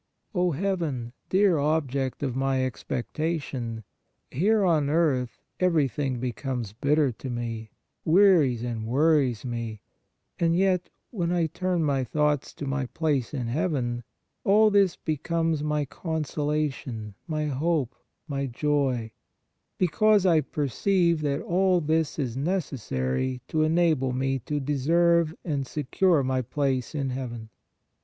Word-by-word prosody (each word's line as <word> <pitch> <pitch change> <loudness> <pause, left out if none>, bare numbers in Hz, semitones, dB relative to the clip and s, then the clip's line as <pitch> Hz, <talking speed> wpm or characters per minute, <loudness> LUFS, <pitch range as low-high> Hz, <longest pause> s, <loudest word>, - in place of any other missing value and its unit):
O 180 -2 +2
Heaven, 150 -9 -2 0.2
dear 190 -4 +4
object 140 -3 0
of 130 -3 -1
my 135 -1 +1
expectation! 130 -2 -3 0.5
Here 205 - +2
on 155 -5 +2
earth 145 -6 +1 0.2
everything 145 -7 +1
becomes 125 -3 -3
bitter 140 +4 +2
to 130 +3 -8
me, 115 -2 -4 0.3
wearies 160 - +4
and 115 -2 -3
worries 135 -3 +2
me; 115 -3 -4 0.6
and 165 -1 +2
yet 185 -1 +2 0.2
when 175 -6 -1
I 175 -2 +2
turn 180 +1 -1
my 140 -3 +1
thoughts 150 +1 0
to 145 - -5
my 135 -1 -1
place 145 -5 -1
in 130 -5 -3
heaven, 120 -3 -1 0.4
all 215 +2 +5
this 200 -3 +4
becomes 165 0 -1
my 150 -1 0
consola 150 -1 -1
tion, 110 -6 -7
my 155 -2 -1
hope, 145 -2 0 0.3
my 140 -2 -2
joy, 130 -3 0 0.7
because 205 +3 +3
I 165 -4 +5
perceive 170 +4 +1
that 145 0 -1
all 185 +1 +2
this 160 -1 0
is 130 -6 -2
necessary 130 - -2
to 155 - +1
enable 155 -5 +2
me 135 +1 0
to 150 -1 -1
deserve 160 +4 +2
and 140 -5 -2
secure 155 +3 +1
my 130 0 0
place 135 +1 -1
in 135 -3 -1
heaven. 120 -4 -6
145 Hz, 130 wpm, -26 LUFS, 130-165 Hz, 0.7 s, all